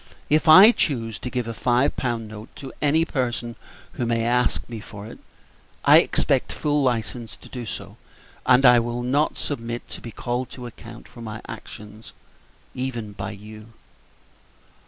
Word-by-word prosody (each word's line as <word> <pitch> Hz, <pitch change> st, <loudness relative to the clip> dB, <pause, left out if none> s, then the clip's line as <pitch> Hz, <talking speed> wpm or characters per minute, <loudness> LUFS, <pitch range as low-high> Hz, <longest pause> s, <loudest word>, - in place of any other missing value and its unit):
If 155 Hz, +2 st, +3 dB
I 185 Hz, +8 st, +10 dB
choose 115 Hz, -, -1 dB
to 125 Hz, -, -5 dB
give 125 Hz, -2 st, -3 dB
a 115 Hz, -, -4 dB
five 125 Hz, +4 st, +1 dB
pound 120 Hz, -3 st, -2 dB
note 105 Hz, +1 st, -10 dB
to 135 Hz, -2 st, -9 dB
any 155 Hz, +3 st, +3 dB
person 120 Hz, -5 st, -2 dB, 0.4 s
who 120 Hz, -, -2 dB
may 115 Hz, -1 st, +1 dB
ask 125 Hz, +1 st, +1 dB
me 115 Hz, -2 st, -7 dB
for 105 Hz, -1 st, -10 dB
it, 110 Hz, -, -11 dB, 0.7 s
I -, -, +9 dB
expect -, -, +1 dB
full 150 Hz, -1 st, 0 dB
license 115 Hz, -4 st, -2 dB
to -, -, -14 dB
do 120 Hz, -3 st, -7 dB
so, -, -, -7 dB, 0.5 s
and 130 Hz, +1 st, +5 dB
I 125 Hz, -1 st, +8 dB
will 120 Hz, +1 st, -3 dB
not 140 Hz, +5 st, +1 dB
submit 120 Hz, -4 st, -4 dB
to -, -, -9 dB
be 115 Hz, -, -8 dB
called 125 Hz, +3 st, -3 dB
to 125 Hz, -, -7 dB
account 115 Hz, 0 st, -11 dB
for 120 Hz, -, -13 dB
my 110 Hz, -1 st, -6 dB
actions 105 Hz, +1 st, -10 dB, 0.6 s
even 120 Hz, -5 st, -4 dB
by 100 Hz, -1 st, -6 dB
you." 105 Hz, +2 st, -11 dB
120 Hz, 165 wpm, -23 LUFS, 115-130 Hz, 0.7 s, I